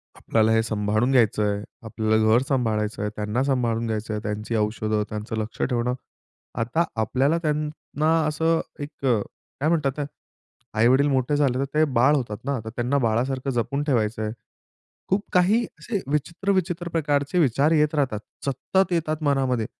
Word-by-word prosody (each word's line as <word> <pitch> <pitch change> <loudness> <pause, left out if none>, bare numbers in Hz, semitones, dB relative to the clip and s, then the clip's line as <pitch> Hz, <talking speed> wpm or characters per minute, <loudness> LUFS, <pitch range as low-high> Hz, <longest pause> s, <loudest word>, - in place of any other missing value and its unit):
"आपल्याला 110 0 +1
हे 110 0 +4
सांभाळून 110 +2 0
घ्यायचंय, 105 -5 +2 0.2
आपल्याला 110 -1 0
घर 120 - +5
सांभाळायचं 110 -6 0
आहे 105 - -1
त्यांना 105 +4 -1
सांभाळून 120 -4 0
घ्यायचं 110 0 -3
आहे, 105 - -3
त्यांची 105 +1 -3
औषधं 110 0 0
त्यांचं 105 +1 -4
लक्ष 110 0 -4
ठेवणं" 125 -1 0 0.7
आता 125 +9 +1 0.2
आपल्याला 135 +8 +2
त्यांना 150 0 -1 0.2
असं 160 +2 +1 0.2
एक 145 - -6 0.2
काय 125 +4 -2
म्हणतात 155 -5 +2
ते - - -1 0.8
आई-वडील 130 +5 +5
मोठे 130 +1 +1
झाले 135 -4 +2
तर 135 - +1
ते 155 +1 +4
बाळ 130 +6 +5
होतात. 115 -6 -2
ना 140 -3 -1
तर - - -4
त्यांना 120 +4 -1
बाळासारखं 130 +4 0
जपून 125 +4 -1
ठेवायचं 115 -6 0
आहे. 105 - -2 0.8
खूप 195 +2 +1
काही 195 +6 +4 0.2
असे 210 -4 -2
विचित्र-विचित्र 175 +2 -1
प्रकारचे 145 0 0
विचार 145 0 +3
येत 150 -1 +3
राहतात 130 -8 0 0.3
सतत 180 +7 0
येतात 155 -2 -1
मनामध्ये. 135 -5 +1
130 Hz, 150 wpm, -24 LUFS, 110-150 Hz, 0.8 s, घर